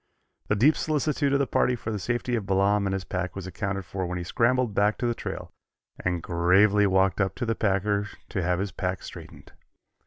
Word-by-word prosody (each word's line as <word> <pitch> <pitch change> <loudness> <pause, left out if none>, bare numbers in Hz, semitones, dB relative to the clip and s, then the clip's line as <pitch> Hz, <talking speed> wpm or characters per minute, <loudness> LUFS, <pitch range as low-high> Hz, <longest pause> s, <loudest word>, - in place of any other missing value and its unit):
The 105 - +2
deep 135 +10 +5
solicitude 150 -2 0
of 140 - +4
the 140 - +1
party 125 -1 +1
for 110 -2 -5
the 105 - -2
safety 120 +3 -2
of 105 -4 -3
Balaam 100 +1 +2
and 95 - -1
his 95 - -3
pack 90 +2 -4
was 95 -2 -6
accounted 95 0 -3
for 95 0 -4
when 90 +1 -3
he 90 - -4
scrambled 120 +5 +1
back 105 +2 +2
to - - -2
the 120 - +1
trail - - -6 0.5
and 90 -3 -1
gravely 95 +4 +4
walked 95 0 +2
up 95 0 0
to 120 - -3
the 115 - +1
packer 105 -1 0 0.2
to 95 - -2
have 90 0 +1
his 100 +1 -2
pack 90 0 -3
straightened. - - -11
100 Hz, 215 wpm, -26 LUFS, 95-115 Hz, 0.5 s, deep